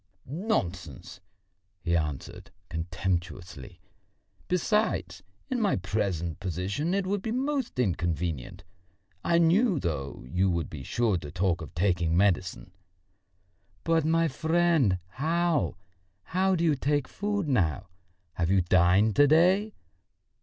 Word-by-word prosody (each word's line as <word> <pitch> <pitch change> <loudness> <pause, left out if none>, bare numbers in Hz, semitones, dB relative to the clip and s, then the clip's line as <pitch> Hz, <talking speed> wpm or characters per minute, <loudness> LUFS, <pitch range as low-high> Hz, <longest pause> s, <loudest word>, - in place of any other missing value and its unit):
"Nonsense!" 95 - -3 0.6
he 85 -1 0
answered 75 -4 -4 0.2
contemptuously. 85 -2 -4 0.7
"Besides, 210 +5 0 0.3
in 255 -3 -1
my 205 -3 +2
present 90 -5 -2
position 100 - -2
it 200 -1 0
would 200 +1 -1
be 220 - -3
most 265 - -2
inconvenient. 85 - -2 0.6
I 170 - +3
knew, 175 - +3
though, 70 - -4
you 90 +8 +1
would 85 -2 -2
be 75 - -7
sure 110 - 0
to 75 - -8
talk 90 +2 0
of 80 -2 -9
taking 85 -2 +1
medicine." 95 -1 +1 1.1
"But, 165 -1 +2
my 165 +1 +2
friend, 160 - +2
how... 160 - 0 0.5
how 190 +2 +1
do 170 - -1
you 160 -3 +4
take 145 0 0
food 205 -3 -2
now? 95 - +1 0.5
Have 85 -1 -1
you 95 0 +4
dined 90 +4 +3
to 145 0 +7
day?" 185 +8 +3
100 Hz, 120 wpm, -28 LUFS, -, 1.1 s, to